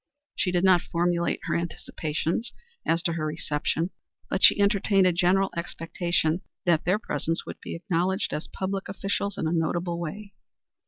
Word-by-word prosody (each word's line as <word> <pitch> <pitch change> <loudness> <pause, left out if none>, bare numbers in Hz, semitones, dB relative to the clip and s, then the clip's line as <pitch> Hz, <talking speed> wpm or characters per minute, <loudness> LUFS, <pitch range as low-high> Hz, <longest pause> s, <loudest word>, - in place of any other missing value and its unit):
She 180 - 0
did 175 0 +1
not 185 -2 +6
formulate 170 0 0
her - - -1
anticipations 170 +4 -2 0.3
as 165 +1 +2
to 170 - +1
her 160 -2 -2
reception, 155 +3 -1 0.4
but 190 - 0
she - - +8
entertained 200 -1 +4
a 180 - +5
general 185 +3 +3
expectation 170 0 -1 0.2
that 170 -3 +3
their 185 +4 +3
presence 165 -5 -2
would - - -8
be - - -6
acknowledged 180 +2 0
as 150 - -3
public 195 0 -3
officials 200 0 -2
in - - -1
a - - 0
notable 170 +1 0
way. 200 +5 -6
175 Hz, 160 wpm, -27 LUFS, 165-190 Hz, 0.4 s, she